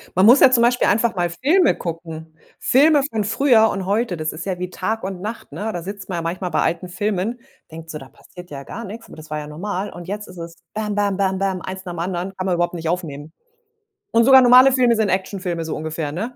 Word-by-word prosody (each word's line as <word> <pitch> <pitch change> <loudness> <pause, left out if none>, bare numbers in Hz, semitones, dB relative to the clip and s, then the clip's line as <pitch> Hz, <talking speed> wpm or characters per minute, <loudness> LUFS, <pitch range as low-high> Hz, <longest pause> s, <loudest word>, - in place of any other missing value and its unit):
Man 185 +2 +4
muss 245 +5 +8
ja 265 - +8
zum 235 -2 +3
Beispiel 245 +1 +3
einfach 230 +1 +2
mal 175 -1 0
Filme 300 - +2
gucken. 165 -2 -7 0.2
Filme 290 +3 +4
von 220 -2 -1
früher 225 +1 +4
und 190 -2 -3
heute, 205 -2 0
das 155 0 -3
ist 160 +3 -7
ja 185 -2 -2
wie 180 0 -5
Tag 220 -1 -3
und 190 -1 -5
Nacht, 220 +3 -6
ne? 215 +2 -4
Da 175 -3 -5
sitzt 200 +1 -8
man 175 - -3
ja - - -2
manchmal 180 +2 -3
bei - - 0
alten 170 +2 -2
Filmen, 205 +5 -2 0.3
denkt 160 0 -9
so, 150 - -6
da 135 0 -13
passiert 180 0 -14
ja 140 -1 -8
gar 230 +10 -8
nichts, 225 +4 -9
aber - - -13
das 155 0 -12
war 155 - -3
ja 150 - -7
normal. 190 +6 -4
Und 175 0 -10
jetzt 205 +2 -5
ist 180 - -13
es: 165 0 -8 0.2
Bäm, 210 -1 -3
bäm, 205 -1 +1
bäm, 190 -1 0
bäm, 190 -1 -1
eins 190 +1 -7
nach 175 - -5
dem 165 - -7
anderen, 180 +2 -3
kann 185 - -4
man 180 - +1
überhaupt 175 0 0
nicht 165 -2 -4
aufnehmen. 155 -4 -4 0.8
Und 230 - +4
sogar 265 -1 +8
normale 255 +2 +7
Filme 250 -2 +3
sind 220 -2 +1
Actionfilme, 185 -3 -2
so 160 - -4
ungefähr, 155 -1 -4
ne? 220 +10 -4
190 Hz, 250 wpm, -21 LUFS, 170-220 Hz, 0.8 s, muss